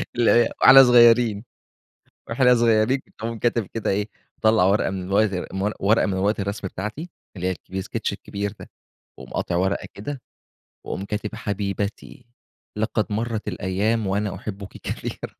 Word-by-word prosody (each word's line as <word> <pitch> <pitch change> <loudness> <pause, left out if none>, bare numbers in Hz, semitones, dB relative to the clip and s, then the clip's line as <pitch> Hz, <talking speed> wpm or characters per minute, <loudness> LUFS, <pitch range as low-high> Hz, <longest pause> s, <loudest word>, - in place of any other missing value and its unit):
اللي 120 -1 +3
هي 120 - +4
وإحنا 135 0 +10
صغيرين 120 -3 +5 0.9
وإحنا 125 +2 +4
صغيرين 115 +2 +2 0.2
اقوم 115 +1 -4
كاتب 120 -1 0
كده 115 - -2
إيه، 100 +2 0 0.3
مطلع 110 -3 +3
ورقة 100 +3 +2
من 95 0 -5 0.7
ورقة 105 +4 +3
من 95 - -1
ورقة 100 +3 0
الرسم 100 0 -4
بتاعتي 105 - -6 0.3
اللي 90 0 -3
هي - - +1
الكب 95 +1 -10
الsketch - - -3
الكبير 100 0 -5
ده، - - -11 0.5
واقوم - - -11
قاطع 85 - -1
ورقة 95 +2 0
كده 130 +5 -6 0.6
واقوم 95 - -4
كاتب 105 +1 -4
حبيبتي 100 -2 -4 0.5
لقد 110 0 0
مرت 110 +1 -3
الأيام 105 +4 -1
وأنا 100 +1 -1
أحبك 100 -1 -8
كثيرًا - - -5
105 Hz, 145 wpm, -23 LUFS, 100-115 Hz, 0.9 s, وإحنا